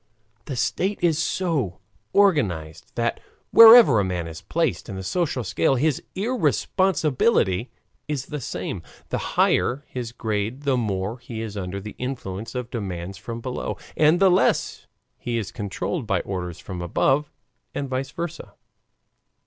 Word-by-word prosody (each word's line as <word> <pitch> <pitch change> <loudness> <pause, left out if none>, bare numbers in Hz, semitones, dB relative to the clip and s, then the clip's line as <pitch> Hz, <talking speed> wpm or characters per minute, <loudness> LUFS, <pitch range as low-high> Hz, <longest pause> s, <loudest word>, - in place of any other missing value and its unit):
The 135 - -4
state 175 - 0
is 160 -2 +3
so 155 - -1 0.3
organized 100 - +1
that - - 0 0.3
wherever 225 - +10
a - - +2
man 90 -3 -2
is 80 -1 -8
placed 165 -6 -1
in 100 - -5
the 95 - -5
social 140 - -1
scale, 115 +6 +1
his 145 +2 +1
irresponsibility 185 - +1 0.4
is 145 -3 -2
the 150 -2 -5
same. 90 -3 -4 0.3
The - - -1 0.2
higher 135 +4 +2
his 120 -2 -5
grade 110 +3 -3
the 140 -2 +2
more 105 -1 -2
he 115 -2 -7
is 105 -2 -6
under 95 -1 -4
the 105 +1 -8
influence 115 -5 -5
of 125 -1 -4
demands 95 -4 -5
from 115 +2 -6
below, 125 +1 -4 0.2
and 155 +3 +4
the 195 -1 +6
less 180 - +1 0.3
he 120 -1 -2
is 110 -4 -3
controlled 115 - -3
by 100 -4 +1
orders 90 -3 -5
from 90 -1 -7
above, 135 - +1 0.4
and 140 - -2
VICE 130 +1 -2
VERSA. 170 +2 -6
120 Hz, 150 wpm, -24 LUFS, 100-150 Hz, 0.4 s, wherever